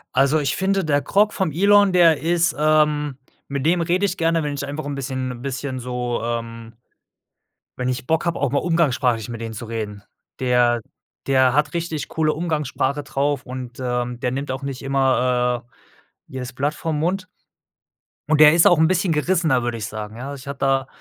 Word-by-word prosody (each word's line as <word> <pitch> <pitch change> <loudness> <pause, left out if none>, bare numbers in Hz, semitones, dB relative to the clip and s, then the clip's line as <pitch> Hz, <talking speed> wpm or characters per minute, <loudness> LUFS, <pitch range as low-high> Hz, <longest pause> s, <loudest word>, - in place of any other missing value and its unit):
Also, 135 +4 +3
ich 140 -3 -1
finde 195 0 0
der 145 -1 +2
Grok 205 +6 +2
vom 190 -5 -1
Elon, 200 +3 +4
der 165 -4 +5
ist, 170 +1 +1
ähm 150 -2 +2 0.3
mit 140 0 -3
dem 175 +2 +3
rede 175 +4 0
ich 185 -1 -2
gerne, 165 -1 +1
wenn 145 -1 -2
ich 140 - -4
einfach 145 +2 -5
'n 145 - -4
bisschen 130 -1 -3
'n 120 -1 -9
bisschen 130 0 -4
so, 125 -1 -3
ähm 115 -1 -5 1.1
wenn 125 - -1
ich 125 0 -3
Bock 160 0 +1
habe, 170 -1 -1
auch 140 - +1
mal 140 - +1
umgangssprachlich 130 - +1
mit 115 - -6
denen 115 -1 -5
zu 115 +2 -7
reden. 110 -3 -5 0.4
Der 120 -2 +2 0.5
der 130 -2 +4
hat 150 +2 +1
richtig 165 -3 -3
coole 155 -1 0
Umgangssprache 150 -3 -2
drauf 140 -1 -1
und, 125 -1 -7
ähm, 125 -1 -2
der 125 - 0
nimmt 140 +2 -4
auch 130 +1 -4
nicht 135 -2 -5
immer, 125 -3 +1
äh, - - -39 0.6
jedes 130 -1 -7
Blatt 145 +4 -1
vorm 155 0 -3
Mund 185 +4 -1 1.0
und 155 -1 +4
der 150 +1 +9
ist 170 - +6
auch 175 - +5
'n 160 +1 +4
bisschen 180 -1 +1
gerissener, 155 -5 +1
würde 120 -1 -2
ich 105 - -4
sagen, 110 0 -7
ja. 135 +3 -6
Ich 135 0 -12
hatte 140 -1 -6
da 135 -1 +1
140 Hz, 195 wpm, -21 LUFS, 125-160 Hz, 1.1 s, der